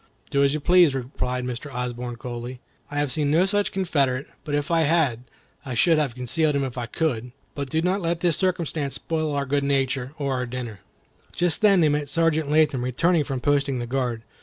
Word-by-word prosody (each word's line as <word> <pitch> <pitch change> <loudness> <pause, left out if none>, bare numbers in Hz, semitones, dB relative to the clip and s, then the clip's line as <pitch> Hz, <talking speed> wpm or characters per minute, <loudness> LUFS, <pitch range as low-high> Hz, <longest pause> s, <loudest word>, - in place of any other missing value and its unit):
"Do 140 0 +3
as 140 +1 +3
you - - -1
please," 175 -2 +5
replied 125 -1 -3
Mr. 125 +3 -5
Osborne, 125 -1 -4
coldly; 120 +1 -6 0.3
"I 145 - -5
have 145 -2 +1
seen 145 +2 +1
no 165 +5 +4
such 205 +1 +1
Confederate; 140 -8 0 0.2
but 145 -3 -2
if 145 +3 -2
I 165 - +4
had, 145 -7 +2 0.4
I 130 -3 -5
should 160 +6 +4
have 140 -6 -1
concealed 150 +5 0
him 140 - +1
if 130 -3 -4
I 120 -2 -4
could. 125 -5 -2 0.2
But 140 -2 -4
do 160 +4 0
not 190 +3 +1
let 165 -1 -1
this 175 -3 +2
circumstance 165 -6 -1
spoil 155 -2 -2
our 140 0 0
good 140 +1 0
nature, 135 -1 0
or 140 -2 -1
our 125 -1 -2
dinner." 120 -4 -6 0.5
Just 175 +2 +1
then 200 -4 +5
they 155 - +4
met 145 -1 -1
Sergeant 160 -1 +1
Latham 150 -4 +3
returning 155 +7 +2
from 135 -3 -4
posting 140 -2 +1
the 120 - -3
guard. 120 -2 -2
140 Hz, 210 wpm, -24 LUFS, 125-160 Hz, 0.5 s, please